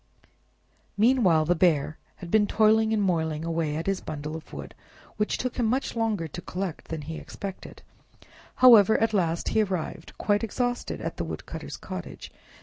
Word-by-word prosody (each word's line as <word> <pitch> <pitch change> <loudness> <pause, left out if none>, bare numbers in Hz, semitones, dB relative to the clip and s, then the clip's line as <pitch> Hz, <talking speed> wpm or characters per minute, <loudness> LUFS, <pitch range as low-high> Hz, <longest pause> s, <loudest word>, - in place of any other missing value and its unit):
Meanwhile 205 -9 +4
the 175 - +3
Bear 160 -3 +1 0.2
had 175 -3 -10
been 210 -1 +4
toiling 220 +1 +3
and 215 -2 +1
moiling 160 -4 0
away 165 -2 -1
at 160 - -3
his 195 -1 -1
bundle 150 +1 -5
of 160 - -10
wood, - - -8 0.4
which 210 - 0
took 255 -1 -3
him 240 -3 +1
much 255 +3 -1
longer 220 -7 0
to 165 +4 -8
collect 180 -1 -5
than 160 -2 -5
he 160 +2 -6
expected; 195 -2 -8 0.7
however, 220 -5 +7
at 225 0 +1
last 170 -4 0
he 220 - +2
arrived 185 -6 -4
quite 205 +1 +1
exhausted 245 +2 -2
at - - -4
the - - -2
woodcutter's - - -7
cottage. - - -8
190 Hz, 165 wpm, -26 LUFS, 160-220 Hz, 0.7 s, however